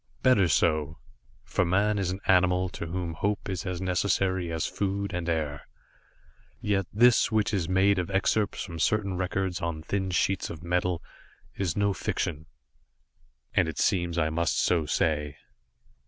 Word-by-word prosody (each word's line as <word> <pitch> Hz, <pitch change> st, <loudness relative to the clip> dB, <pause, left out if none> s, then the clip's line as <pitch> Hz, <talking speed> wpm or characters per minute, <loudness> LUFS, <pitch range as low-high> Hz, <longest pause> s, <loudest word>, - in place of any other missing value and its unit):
Better 105 Hz, -8 st, +5 dB
so 75 Hz, -1 st, +1 dB, 0.5 s
for -, -, 0 dB
man 100 Hz, +4 st, +2 dB
is 95 Hz, -2 st, -1 dB
an 95 Hz, +2 st, -4 dB
animal 90 Hz, 0 st, +3 dB
to 85 Hz, -, -6 dB
whom 85 Hz, 0 st, -3 dB
hope 100 Hz, +6 st, -2 dB
is 95 Hz, 0 st, -4 dB
as 90 Hz, -2 st, -3 dB
necessary 95 Hz, -1 st, 0 dB
as 80 Hz, -1 st, -1 dB
food 100 Hz, 0 st, -2 dB
and 85 Hz, -1 st, -2 dB
air. 75 Hz, -3 st, -2 dB, 0.9 s
Yet 100 Hz, -3 st, 0 dB
this 120 Hz, +3 st, +4 dB
which 110 Hz, -1 st, +1 dB
is 90 Hz, -4 st, -1 dB
made 95 Hz, +1 st, +3 dB
of 90 Hz, -, -3 dB
excerpts 100 Hz, +2 st, 0 dB
from 85 Hz, -4 st, -7 dB
certain 100 Hz, +1 st, +1 dB
records 95 Hz, 0 st, -2 dB
on 85 Hz, -2 st, -3 dB
thin 95 Hz, +2 st, -2 dB
sheets 95 Hz, +2 st, 0 dB
of 80 Hz, 0 st, -8 dB
metal 90 Hz, 0 st, 0 dB, 0.5 s
is 95 Hz, -3 st, -2 dB
no 100 Hz, -1 st, +2 dB
fiction, 80 Hz, -4 st, -3 dB, 1.1 s
and -, -, +3 dB
it 80 Hz, -4 st, -5 dB
seems 85 Hz, -2 st, +1 dB
I 80 Hz, -1 st, +1 dB
must 85 Hz, +1 st, 0 dB
so 85 Hz, -4 st, +2 dB
say. 75 Hz, -1 st, 0 dB
90 Hz, 155 wpm, -27 LUFS, 85-100 Hz, 1.1 s, Better